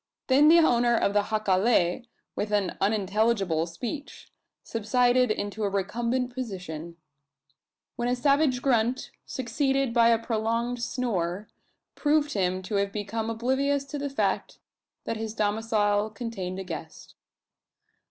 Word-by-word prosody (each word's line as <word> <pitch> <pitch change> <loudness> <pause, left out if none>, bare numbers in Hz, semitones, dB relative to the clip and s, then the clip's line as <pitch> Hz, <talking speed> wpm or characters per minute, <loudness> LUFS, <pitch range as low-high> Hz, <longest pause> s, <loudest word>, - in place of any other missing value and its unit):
Then 280 +3 +5
the 330 +2 +8
owner 240 -7 +4
of 200 - +1
the 205 - +4
jacale, 210 0 +1 0.3
with 210 0 -3
an 205 -3 0
unintelligible 200 -4 +1
speech, 245 - -7 0.3
subsided 245 +3 +2
into 210 0 -2
a 200 - +1
recumbent 235 +6 -1
position; 180 -9 -6 1.0
when 240 - -1
a 250 - +1
savage 275 -1 +2
grunt, 245 -1 +1 0.2
succeeded 270 +1 0
by 230 -1 +5
a 230 - +5
prolonged 230 +1 -1
snore, 210 -6 -2 0.4
proved 295 0 +1
him 185 -1 0
to 200 +2 -2
have 200 0 0
become 220 +2 -3
oblivious 265 +5 0
to 285 +1 -6
the 285 0 -2
fact 275 - -1 0.5
that 225 - -3
his 220 0 -5
domicile 210 -1 +1
contained 215 -5 -5
a 190 - -4
guest. 165 -3 -8
225 Hz, 130 wpm, -27 LUFS, 200-250 Hz, 1.0 s, the